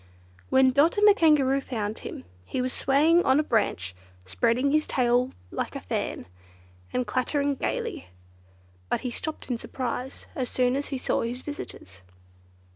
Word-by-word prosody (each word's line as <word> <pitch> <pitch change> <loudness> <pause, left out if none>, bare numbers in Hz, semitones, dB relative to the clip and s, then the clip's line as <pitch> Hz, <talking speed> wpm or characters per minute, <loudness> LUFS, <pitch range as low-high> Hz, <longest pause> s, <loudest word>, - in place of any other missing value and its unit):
When 260 0 +5
Dot 290 +8 +3
and 415 +1 +6
the 415 - +9
Kangaroo 285 -7 +4
found 220 -5 -4
him, 85 - -8 0.2
he 170 - -4
was 255 0 -1
swaying 300 +6 +4
about 355 - +1
on 265 +2 +5
a - - +2
branch, 95 - 0 0.3
spreading 230 - +1
his 305 +1 +3
big - - -5
tail 250 0 +3 0.2
like - - -3
a - - -3
fan, - - -3 0.7
and 250 - 0
clattering 280 +3 0
gaily; 455 - -3 0.8
but - - 0
he 250 - -3
stopped 310 +1 -5
in 235 - -1
surprise 255 +1 -4
as 255 -2 -2
soon 250 0 +2
as 285 +1 -2
he 270 - -3
saw - - 0
his 240 +2 -4
visitors. 95 - -8
260 Hz, 170 wpm, -26 LUFS, 245-295 Hz, 0.8 s, the